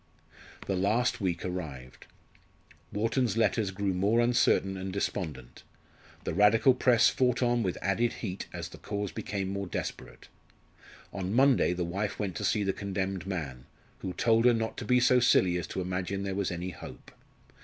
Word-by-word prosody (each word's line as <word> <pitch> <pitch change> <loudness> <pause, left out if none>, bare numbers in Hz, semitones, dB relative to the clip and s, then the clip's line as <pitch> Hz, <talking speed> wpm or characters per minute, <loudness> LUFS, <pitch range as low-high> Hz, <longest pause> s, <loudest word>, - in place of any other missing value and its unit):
The 95 - -1
last 110 +6 +1
week 90 -3 -1
arrived. 75 -9 -6 0.8
Wharton's 115 +1 0
letters 110 -2 +2
grew 95 0 -1
more 100 +6 +2
uncertain 120 -5 +3
and 95 0 -5
despondent; 80 -10 -4 0.6
the - - -3
Radical 105 +7 +5
press 125 -2 +4
fought 125 -1 +1
on 120 0 +2
with 95 -5 -1
added 115 +5 +1
heat 95 -4 -5
as - - -6
the - - -12
cause 100 -1 -4
became 100 -2 -4
more 100 0 -3
desperate. - - -6 0.9
On 95 -1 -3
Monday 135 -6 +4
the 90 -1 -2
wife 100 +4 -3
went 100 -5 -3
to - - -4
see 105 - +1
the 95 -1 0
condemned 95 -2 -3
man, 70 -10 -5 0.3
who 95 - -5
told 115 +5 +2
her 120 -1 +6
not 115 0 -2
to 120 - -5
be 125 +3 +4
so 125 +1 +5
silly 95 -7 +4
as 85 - -5
to 95 - -4
imagine 95 +2 -3
there 100 -1 -2
was 100 0 -1
any 90 +1 -4
hope. - - -11
100 Hz, 170 wpm, -29 LUFS, 90-115 Hz, 0.9 s, her